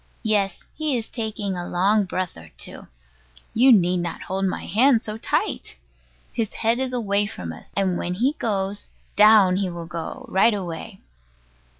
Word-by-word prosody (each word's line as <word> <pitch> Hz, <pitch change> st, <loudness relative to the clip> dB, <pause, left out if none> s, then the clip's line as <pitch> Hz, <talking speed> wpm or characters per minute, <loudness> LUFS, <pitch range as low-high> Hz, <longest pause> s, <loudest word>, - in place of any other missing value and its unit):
Yes; 205 Hz, -4 st, 0 dB
he 305 Hz, -4 st, -1 dB
is 225 Hz, -, -4 dB
taking 215 Hz, -4 st, -3 dB
a 175 Hz, 0 st, -4 dB
long 200 Hz, +4 st, +2 dB
breath 185 Hz, -1 st, -3 dB
or 80 Hz, -1 st, -12 dB
two. -, -, -8 dB, 0.7 s
You 255 Hz, +3 st, +6 dB
need 180 Hz, -5 st, +4 dB
not 175 Hz, -1 st, -4 dB
hold 190 Hz, +1 st, -2 dB
my 185 Hz, -, -2 dB
hand 235 Hz, +4 st, +4 dB
so 215 Hz, 0 st, -6 dB
tight. -, -, -2 dB, 0.6 s
His 225 Hz, -3 st, -1 dB
head 230 Hz, +2 st, +1 dB
is 260 Hz, -1 st, -1 dB, 0.4 s
from 85 Hz, -2 st, -6 dB
us; 80 Hz, -, -14 dB
and 190 Hz, -3 st, +1 dB
when 180 Hz, +1 st, -2 dB
he 255 Hz, +9 st, +1 dB
goes 200 Hz, -2 st, -2 dB, 0.3 s
down 210 Hz, -3 st, +6 dB
he 195 Hz, -2 st, 0 dB
will 170 Hz, -1 st, -6 dB
go 165 Hz, 0 st, -6 dB
right 210 Hz, +4 st, +3 dB
away. 185 Hz, 0 st, -6 dB
195 Hz, 165 wpm, -23 LUFS, 180-220 Hz, 0.7 s, You